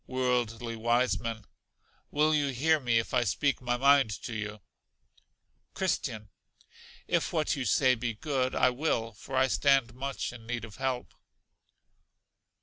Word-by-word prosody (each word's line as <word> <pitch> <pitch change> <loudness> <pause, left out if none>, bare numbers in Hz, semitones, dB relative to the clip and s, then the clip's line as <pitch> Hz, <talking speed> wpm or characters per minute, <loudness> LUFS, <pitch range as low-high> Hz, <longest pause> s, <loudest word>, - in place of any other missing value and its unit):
Worldly 120 -2 -1
Wiseman. 115 -1 0 0.6
Will 155 +1 +2
you 145 -2 +2
hear 150 +5 +2
me 120 -4 +1
if 115 - -2
I 125 - +3
speak 140 +7 0
my 120 -1 0
mind 140 -2 +5
to 120 - -5
you? 105 -1 -5 1.2
Christian. 105 -2 -2 0.8
If - - 0
what 160 -1 0
you 135 -3 -3
say 130 +4 +4
be 120 -2 -3
good, 130 0 -1
I 130 - +4
will, 125 -4 -1
for 130 +5 -8
I 130 0 +4
stand 135 -2 +2
much 135 0 -4
in 115 -2 -12
need 120 -1 -3
of 110 - -13
help. 130 -2 -3
125 Hz, 145 wpm, -29 LUFS, 115-135 Hz, 1.2 s, mind